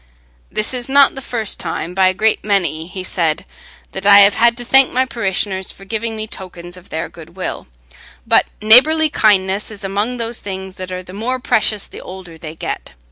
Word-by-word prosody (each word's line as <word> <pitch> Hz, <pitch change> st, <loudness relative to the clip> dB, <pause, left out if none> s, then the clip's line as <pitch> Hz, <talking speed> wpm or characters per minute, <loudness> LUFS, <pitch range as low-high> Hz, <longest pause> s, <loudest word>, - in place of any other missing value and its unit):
"This 215 Hz, +4 st, 0 dB
is 250 Hz, 0 st, -3 dB
not 280 Hz, 0 st, +5 dB
the 270 Hz, -, -8 dB
first 225 Hz, -5 st, -1 dB
time, 165 Hz, 0 st, -4 dB
by 190 Hz, 0 st, +3 dB
a 185 Hz, -, +2 dB
great 220 Hz, +3 st, +1 dB
many," 170 Hz, -6 st, 0 dB
he 185 Hz, +1 st, -7 dB
said, 165 Hz, -4 st, -1 dB, 0.5 s
"that 190 Hz, -, -6 dB
I 200 Hz, 0 st, +8 dB
have 200 Hz, +1 st, +6 dB
had 235 Hz, 0 st, +3 dB
to 245 Hz, -, -5 dB
thank 270 Hz, +2 st, +5 dB
my 260 Hz, +1 st, +1 dB
parishioners 195 Hz, -5 st, -2 dB
for 195 Hz, -, -13 dB
giving 225 Hz, +2 st, -3 dB
me 215 Hz, 0 st, -4 dB
tokens 180 Hz, -4 st, -7 dB
of 180 Hz, -, -13 dB
their -, -, -3 dB
goodwill, -, -, -7 dB, 0.6 s
but -, -, +3 dB, 0.2 s
neighbourly 305 Hz, +8 st, +6 dB
kindness 200 Hz, -3 st, +2 dB
is 210 Hz, -2 st, -9 dB
among 205 Hz, +6 st, -2 dB
those 230 Hz, 0 st, -3 dB
things 190 Hz, -1 st, -7 dB
that 185 Hz, 0 st, -7 dB
are 185 Hz, 0 st, -5 dB
the 180 Hz, -, -12 dB
more 235 Hz, +6 st, -2 dB
precious 220 Hz, -5 st, 0 dB
the -, -, -11 dB
older 185 Hz, -3 st, -10 dB
they 155 Hz, 0 st, -8 dB
get. -, -, -6 dB
200 Hz, 195 wpm, -17 LUFS, 185-230 Hz, 0.6 s, I